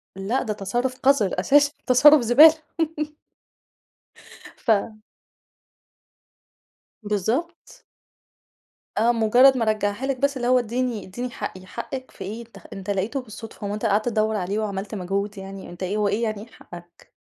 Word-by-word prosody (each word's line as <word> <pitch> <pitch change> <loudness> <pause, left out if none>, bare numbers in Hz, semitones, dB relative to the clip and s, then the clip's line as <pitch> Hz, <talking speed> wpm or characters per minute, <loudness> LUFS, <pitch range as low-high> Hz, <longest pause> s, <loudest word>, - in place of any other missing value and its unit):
لأ 195 +7 -1
ده 215 - -2
تصرف 240 +6 -3
قذر 255 -10 +2
أساسًا 285 +8 +4 0.2
تصرف 290 +3 +7
زبالة. 270 +7 +7 2.1
ف 215 -1 +1 2.0
بالضبط. 225 - -3 1.1
آه 230 +3 +4
مجرد 245 +4 +5
ما 230 - 0
رجعها 215 +2 -1
لِك 270 -1 -1
بس، 280 0 0
اللي 240 -1 -2
هو 255 0 +4
ادِّيني 240 -1 -3
ادِّيني 245 +7 -5
حقي، 185 -5 -7
حقك 255 +6 -7
في - - -9
إيه؟! 210 +4 -6
أنت 220 -4 -15
خ - - -22
أنت 195 0 -8
لقيته 205 +8 -1
بالصدفة، 220 -2 -9
هو 200 - -3
أنت 215 +2 -4
قعدت 215 +2 +1
تدوّر 220 -1 0
عليه 195 +2 -2
وعملت 205 0 -4
مجهود 200 +2 -3
يعني، 195 0 -9
أنت 175 +1 -8
إيه، 190 +3 -2
هو 210 -1 +1
إيه 205 +4 -1
يعني 215 -2 -2
إيه 220 - -11
حقك؟! 175 -3 -14
215 Hz, 150 wpm, -23 LUFS, 200-250 Hz, 2.1 s, تصرف